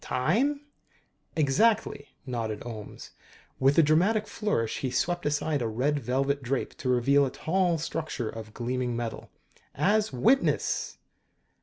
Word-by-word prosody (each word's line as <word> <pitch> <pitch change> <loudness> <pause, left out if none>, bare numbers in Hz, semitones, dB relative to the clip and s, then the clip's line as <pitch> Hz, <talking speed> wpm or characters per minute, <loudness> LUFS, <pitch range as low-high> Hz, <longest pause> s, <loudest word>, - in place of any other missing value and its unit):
"Time?" 240 - +1 0.7
"Exactly," 160 +2 +2 0.2
nodded 115 -5 -3
Ohms. 110 -4 -8 0.5
With 135 +2 +3
a 165 - +7
dramatic 185 +9 +3
flourish 205 - -1
he 130 - -2
swept 175 +6 -1
aside 145 -1 0
a 115 - 0
red 135 +7 0
velvet 135 +2 0
drape 130 +1 -2
to 130 - -3
reveal 135 +3 +4
a 135 - +1
tall 175 +4 0
structure 155 -6 -3
of 110 -1 -7
gleaming 125 0 -2
metal. 115 -1 -5 0.5
"As 210 +7 +2
witness!" 235 - +1
140 Hz, 130 wpm, -28 LUFS, 125-175 Hz, 0.7 s, a